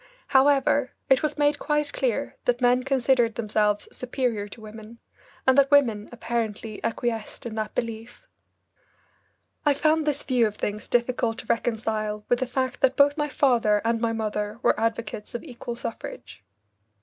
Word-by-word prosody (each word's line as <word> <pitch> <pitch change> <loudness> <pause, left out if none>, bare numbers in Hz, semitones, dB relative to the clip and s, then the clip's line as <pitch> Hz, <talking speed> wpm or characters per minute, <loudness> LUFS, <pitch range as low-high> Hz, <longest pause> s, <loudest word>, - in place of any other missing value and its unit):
However, 275 0 +3 0.2
it 265 - +6
was 305 - -1
made 290 0 +2
quite 295 -1 0
clear 250 -5 -1
that 245 0 +2
men 250 0 +3
considered 255 -3 +2
themselves 210 -2 0
superior 245 -5 -2
to 205 - -12
women, 220 +1 -11 0.5
and 260 - +5
that 275 0 +4
women 235 -8 +3
apparently 225 -2 -4
acquiesced 230 -1 -3
in 235 - -5
that 215 -1 -4
belief. 230 - -5 1.4
I 290 -2 +3
found 310 +1 +2
this 290 -1 0
view 250 -4 +2
of 210 - -6
things 210 0 -4
difficult 240 -1 0
to - - -8
reconcile 215 -2 -1
with 245 - +3
the 260 - -1
fact 260 0 -2
that 265 0 +3
both 285 0 +5
my 295 -1 -1
father 235 -7 +3
and 230 0 +1
my 230 -1 +1
mother 210 -1 -3
were - - +3
advocates 225 -1 -3
of 240 - -4
equal 240 -5 -7
suffrage. 105 - -7
235 Hz, 160 wpm, -25 LUFS, 220-265 Hz, 1.4 s, it